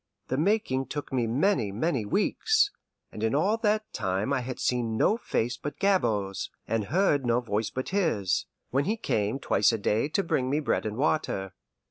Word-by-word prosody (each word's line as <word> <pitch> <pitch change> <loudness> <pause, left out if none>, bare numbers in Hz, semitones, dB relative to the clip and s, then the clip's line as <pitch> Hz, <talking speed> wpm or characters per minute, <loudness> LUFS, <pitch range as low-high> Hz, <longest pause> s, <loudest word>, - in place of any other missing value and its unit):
The 130 - 0
making 155 -7 +1
took 145 -2 -5
me 120 -3 +1
many, 125 - +1
many 120 - -1
weeks, 410 - +2 0.4
and 105 - -8
in 110 +4 +1
all 195 +9 +3
that 215 -1 0
time 95 +8 -1
I 130 - +1
had 125 +1 -6
seen 120 -3 0
no 210 - +3
face 120 - -1
but 145 - -6
Gabord's, 110 - +1 0.2
and 115 -2 0
heard 155 - +2
no 120 -1 +2
voice 110 -2 -2
but 130 - -4
his, 155 - 0 0.2
when 140 +2 +1
he 220 +5 0
came 110 - 0
twice 135 - +3
a 115 - 0
day 110 +6 0
to 195 +6 +1
bring 130 -6 0
me 145 +3 +1
bread 145 - 0
and 105 +1 -5
water. 125 -10 0
130 Hz, 185 wpm, -28 LUFS, 110-170 Hz, 0.4 s, all